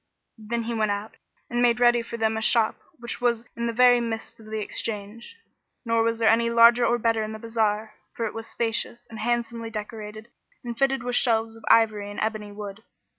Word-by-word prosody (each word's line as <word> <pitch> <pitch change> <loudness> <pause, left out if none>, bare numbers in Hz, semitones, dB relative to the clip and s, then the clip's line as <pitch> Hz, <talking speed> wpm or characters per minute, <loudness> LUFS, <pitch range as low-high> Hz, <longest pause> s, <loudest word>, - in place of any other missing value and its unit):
Then 230 +2 -3
he 235 +1 -3
went 215 -2 0
out 205 +2 -4 0.3
and 240 0 -1
made 240 0 +3
ready 240 -1 +4
for 235 0 -7
them 220 -1 +1
a 220 - -2
shop 225 0 +3 0.2
which 235 -1 -7
was 235 -1 +1
in 235 0 -2
the - - 0
very 245 +1 +5
midst 225 -1 -5
of 220 - -14
the 220 0 -4
Exchange; 215 - -5 0.5
nor 230 0 +2
was 230 0 +1
there 225 -1 +2
any 230 +1 +4
larger 235 +1 +6
or 240 0 +3
better 230 -1 +1
in 215 0 -4
the - - -6
bazar, 220 -1 -1 0.2
for 230 - -2
it 215 - -4
was 225 0 -7
spacious 235 0 -2
and 220 - -8
handsomely 235 0 -2
decorated 215 0 -7 0.3
and 240 -1 -5
fitted 270 +1 +1
with 245 0 -3
shelves 225 -2 +2
of 225 - -15
ivory 215 -3 +4
and 205 - -7
ebony 215 -1 -3
wood. 205 0 -8
225 Hz, 210 wpm, -25 LUFS, 220-235 Hz, 0.5 s, larger